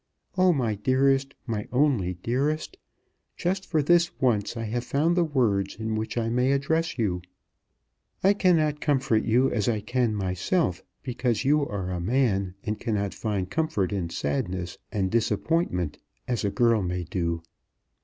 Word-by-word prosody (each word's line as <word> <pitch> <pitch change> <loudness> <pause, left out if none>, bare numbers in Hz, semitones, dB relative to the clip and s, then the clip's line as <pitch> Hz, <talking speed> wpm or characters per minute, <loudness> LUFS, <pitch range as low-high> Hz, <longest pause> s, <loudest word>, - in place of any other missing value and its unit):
Oh, 185 -1 +5
my 125 -9 0
dearest, 135 +5 +2
my 110 -4 -3
only 125 -10 +2
dearest, 145 +6 -1 0.6
just 190 +2 -1
for 155 -4 +1
this 170 +2 +3
once 120 -4 +1
I 115 - -3
have 115 +2 -2
found 155 +7 +1
the 175 - +3
words 115 -11 +1
in 110 0 -3
which 110 +2 -3
I 115 -1 0
may 125 +3 +2
address 160 +4 0
you. 95 -7 0 1.0
I 195 +2 +6
cannot 160 -7 +2
comfort 135 -7 +2
you 125 +4 +3
as 110 -1 +1
I 110 -2 +1
can 120 0 0
myself, 95 - 0 0.2
because 125 -1 -1
you 150 +2 +4
are 95 -3 -3
a 90 - -2
man, 100 -4 +1
and 105 0 -3
cannot 100 -4 -1
find 100 -5 -2
comfort 105 - -1
in 90 -4 -2
sadness 90 +4 -3
and 95 -3 -1
disappointment, 110 - 0 0.3
as 120 -3 -1
a 100 - +2
girl 115 0 +3
may 90 -1 -2
do. 85 -1 -2
115 Hz, 155 wpm, -26 LUFS, 100-140 Hz, 1.0 s, I